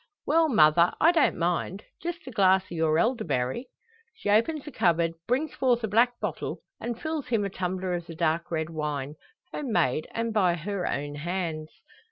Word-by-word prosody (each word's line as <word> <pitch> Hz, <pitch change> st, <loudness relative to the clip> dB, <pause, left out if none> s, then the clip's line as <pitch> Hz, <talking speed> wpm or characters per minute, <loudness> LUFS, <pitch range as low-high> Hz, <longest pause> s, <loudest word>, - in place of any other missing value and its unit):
"Well, 320 Hz, +2 st, +3 dB
mother; 170 Hz, -, +5 dB
I 330 Hz, -, +6 dB
don't 330 Hz, -3 st, +2 dB
mind. 175 Hz, +3 st, -1 dB, 0.2 s
Just 345 Hz, -2 st, -5 dB
a 260 Hz, -, -7 dB
glass 190 Hz, -4 st, +4 dB
o' -, -, -4 dB
your 160 Hz, -1 st, +2 dB
elderberry." 175 Hz, -, 0 dB, 0.5 s
She 205 Hz, -, -2 dB
opens 275 Hz, +8 st, +2 dB
a 295 Hz, -, -7 dB
cupboard, 170 Hz, -6 st, +2 dB
brings 270 Hz, +6 st, 0 dB
forth 245 Hz, -3 st, +1 dB
a -, -, +1 dB
black 235 Hz, +3 st, +3 dB
bottle, -, -, -4 dB, 0.2 s
and 235 Hz, 0 st, -4 dB
fills 315 Hz, -3 st, -3 dB
him 225 Hz, -5 st, +1 dB
a 200 Hz, -, -3 dB
tumbler 185 Hz, 0 st, -2 dB
of 175 Hz, -1 st, -4 dB
the 165 Hz, -, -8 dB
dark 165 Hz, 0 st, 0 dB
red 160 Hz, -1 st, -2 dB
wine 150 Hz, -3 st, -3 dB, 0.4 s
home 280 Hz, -5 st, -4 dB
made, 140 Hz, -, +1 dB
and 230 Hz, 0 st, -2 dB
by 185 Hz, -5 st, +3 dB
her 185 Hz, +2 st, -3 dB
own 145 Hz, +1 st, -3 dB
hands. 160 Hz, 0 st, -3 dB
185 Hz, 185 wpm, -27 LUFS, 165-240 Hz, 0.5 s, I